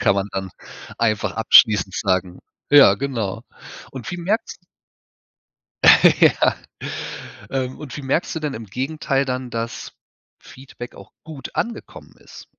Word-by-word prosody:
Kann - - +3
man 100 0 -2
dann 95 -1 -4 0.5
einfach 110 -3 0
abschließend 105 -3 +5
sagen. 95 -3 -1 0.3
Ja, 145 -1 +8
genau. 115 -6 -4 0.5
Und 130 -4 -7
wie 175 - -4
merkst 195 +7 -3 1.6
Ja. - - +4 0.9
Ähm, 130 -1 -3
und 145 -3 -8
wie 145 - -7
merkst 135 +7 -1
du 160 - -4
denn 150 -3 -3
im 115 0 -8
Gegenteil 135 +4 -2
dann, 130 -1 -4
dass 115 0 -5 0.5
Feedback 125 -2 -12
auch 100 - -14
gut 155 -4 -9
angekommen 235 0 -5
ist? - - -14
125 Hz, 130 wpm, -21 LUFS, 105-140 Hz, 1.6 s, Ja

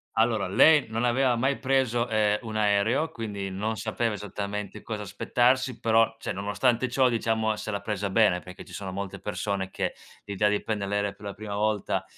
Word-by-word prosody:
Allora, 110 -3 +2
lei 140 +9 +5
non 115 +2 -1
aveva 125 0 +3
mai 135 +3 +1
preso, 130 -3 +1
uhm, 105 -1 +2
un 110 -2 -7
aereo, 105 +8 +2
quindi 100 -4 -5
non 110 +3 -2
sapeva 115 -1 -1
esattamente 105 0 -5
cosa 105 -2 -5
aspettarsi, 125 +5 +1
però 115 0 +3
cioè - - -3
nonostante 115 +6 0
ciò, 130 +1 +3
diciamo, 110 -2 0
se 110 - -6
l'ha 100 - -2
presa 100 -1 -3
bene, 100 -3 +4
perché 90 +1 -11
ci - - -14
sono 95 -2 -5
molte 100 0 -5
persone 100 -2 -3
che, - - -2 0.3
l'idea 105 +1 +1
di 105 - 0
prender 105 -2 -2
l'aereo 100 -1 0
per 105 - -14
la 100 - -4
prima 105 -1 -6
volta, 105 -1 0
110 Hz, 185 wpm, -27 LUFS, 100-120 Hz, 0.3 s, lei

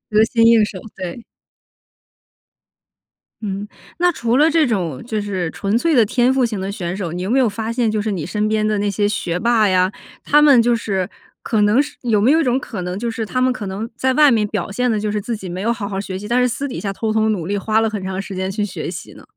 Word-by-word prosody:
得 215 - +6
心 230 0 +1
应 230 -2 +6
手， 200 -2 -7 0.2
对。 190 +5 -6 2.2
嗯， 200 -1 -4 0.3
那 355 0 +4
除 235 -5 -1
了 305 +4 +5
这 315 -2 +3
种 175 - -2
就 220 -3 -2
是 190 -5 -2
纯 200 +2 -1
粹 325 +5 +1
的 235 -3 +5
天 245 +4 +2
赋 265 -2 +2
型 220 -4 -3
的 190 +1 -3
选 180 -3 -4
手， 180 -5 -4
你 180 - -4
有 185 - -3
没 260 +4 +3
有 255 - +4
发 220 +2 -3
现 235 -1 +1
就 215 -1 0
是 215 0 -2
你 170 -6 -3
身 210 +4 -1
边 215 0 +1
的 215 -1 +1
那 205 0 0
些 205 +1 +1
学 180 -4 -2
霸 230 0 +3
呀， 185 0 +2 0.3
他 295 +1 +5
们 280 -5 +7
就 240 0 +2
是 195 -4 -2 0.3
可 220 -5 0
能 210 +6 +4
是 295 - -6
有 230 -4 +1
没 225 +7 +4
有 320 +2 +4
一 - - +1
种 255 -1 +1
可 220 -7 -6
能， 180 +2 -4
就 235 - -2
是 230 -1 -3
他 255 +4 -2
们 255 0 +3
可 210 -5 -6
能 200 +4 -5
在 260 +1 +1
外 300 +1 +6
面 225 -4 +2
表 200 -5 -3
现 250 +4 0
得 215 - 0
就 210 - -2
是 210 0 -1
自 225 +2 -3
己 190 - -8
没 180 +2 -5
有 230 - +1
好 220 -4 -3
好 195 -1 -3
学 190 -2 -5
习， 210 - -7
但 240 +3 +2
是 250 - +3
私 280 +4 -3
底 260 - -6
下 200 - -2
偷 215 +2 -2
偷 220 0 +2
努 195 -7 -1
力 205 - -1
花 215 +2 +1
了 225 0 +1
很 210 -3 -5
长 190 0 -3
时 195 -1 -8
间 190 +1 -2
去 210 +1 -1
学 195 - -5
习 170 - -8
呢？ - - -15
215 Hz, 290 characters per minute, -19 LUFS, 195-240 Hz, 2.2 s, 们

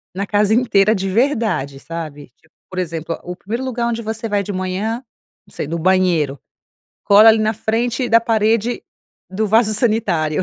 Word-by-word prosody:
Na 200 +2 -2
casa 205 +1 +2
inteira 220 -3 +3
de 195 -1 -2
verdade, 215 - 0
sabe 155 -2 -7
tipo, - - -31 0.2
por 185 - -5
exemplo, 165 -2 -4
o 180 - -6
1º 220 +7 -5
lugar 245 -2 -2
onde 230 -1 -2
você 225 +1 -4
vai 205 -2 0
de 205 - -5
manhã, 195 +6 -3 0.4
não - - -21
sei, - - -4
no 165 +2 -3
banheiro, 170 -6 +1 0.7
cola 210 +2 +7
ali 220 0 +6
na 215 0 +1
frente 235 +3 -1
da 230 +1 +5
parede 225 +1 0 0.5
do 210 +4 -2
vaso 215 +1 +3
sanitário. 200 - 0
210 Hz, 175 wpm, -18 LUFS, 185-225 Hz, 0.7 s, cola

